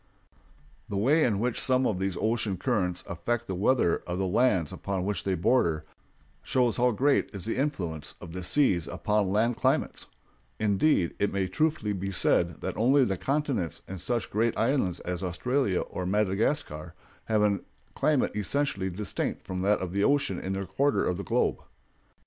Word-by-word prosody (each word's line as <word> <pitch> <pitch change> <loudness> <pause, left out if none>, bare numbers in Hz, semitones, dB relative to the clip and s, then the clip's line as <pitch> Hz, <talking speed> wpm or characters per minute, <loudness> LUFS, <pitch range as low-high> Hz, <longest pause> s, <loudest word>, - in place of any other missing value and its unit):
The 100 - -2
way 145 +10 +3
in 110 -5 +2
which 120 +1 0
some 130 0 +3
of 95 -6 0
these 95 -2 -2
ocean 110 -3 0
currents 90 -1 -1
affect 110 +6 -2
the 95 - -4
weather 100 -1 +2
of 90 0 -2
the 95 - 0
lands 95 - +2
upon 95 -2 -3
which 105 0 -2
they 95 -1 0
border 85 -5 +2 0.6
shows 125 -4 +1
how 125 +1 +4
great 135 +5 +2
is 100 - -6
the 115 - -2
influence 85 - -2
of 85 - -9
the 90 - -5
sea 95 +1 +3
upon 105 +2 0
land 110 +4 +1
climates; - - 0 0.5
indeed, 100 - +2
it 100 - +1
may 100 0 0
be 95 - -3
truthfully 105 - -1
said 85 -2 +1
that - - -4
only 130 +4 +4
the 95 - -1
continents 135 - -2
and 95 -2 -7
such 120 -2 -2
great 115 +2 +1
islands 115 -7 +1
as 90 0 -4
Australia 100 +3 0
or 90 - -5
Madagascar 100 - -1 0.3
have 110 -2 +2
any 100 -1 +2 0.3
climate 150 -8 +1
essentially 105 -2 -1
distinct 100 +4 -3
from 90 -1 -4
that 105 +2 +2
of 90 -1 -4
the 100 0 +1
ocean 140 -10 +2
in 95 - -3
their 95 0 -3
quarter 140 +10 +1
of 90 - 0
the 100 - -4
globe. - - +1
100 Hz, 175 wpm, -28 LUFS, 90-125 Hz, 0.6 s, how